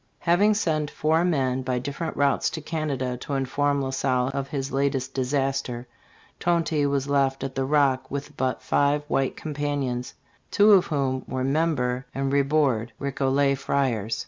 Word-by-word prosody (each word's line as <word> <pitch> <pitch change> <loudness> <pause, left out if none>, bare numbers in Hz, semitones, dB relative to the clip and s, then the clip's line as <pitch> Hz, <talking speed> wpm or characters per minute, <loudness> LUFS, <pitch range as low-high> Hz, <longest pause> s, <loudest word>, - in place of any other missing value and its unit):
Having 200 +5 +3
sent 155 -7 0
four 160 +3 +1
men 130 -7 +1
by 130 -1 -1
different 140 +6 -4
routes 140 -1 +2
to 160 - -5
Canada 145 -6 -3
to 140 +3 -4
inform 140 +1 0
La 130 - -2
Salle 130 -1 0
of 140 -1 -3
this 135 -2 -3
latest 135 -1 -1
disaster, 135 -2 -1 0.5
Tonty 165 -4 +1
was 140 -1 -1
left 135 -1 +1
at 135 -1 -4
the 135 0 -1
Rock 135 -2 +2
with 140 +1 -5
but 130 -2 -2
five 145 +1 +2
white 135 -2 0
companions, 145 -5 -3 0.3
two 210 +1 +5
of 195 -3 +6
whom 135 -4 -1
were 130 -1 -2
Membre 135 -3 0
and 135 0 -1
Ribourde, 140 -5 +1
Recollet 140 0 +1
friars. 115 -7 -1
140 Hz, 155 wpm, -25 LUFS, 130-145 Hz, 0.5 s, of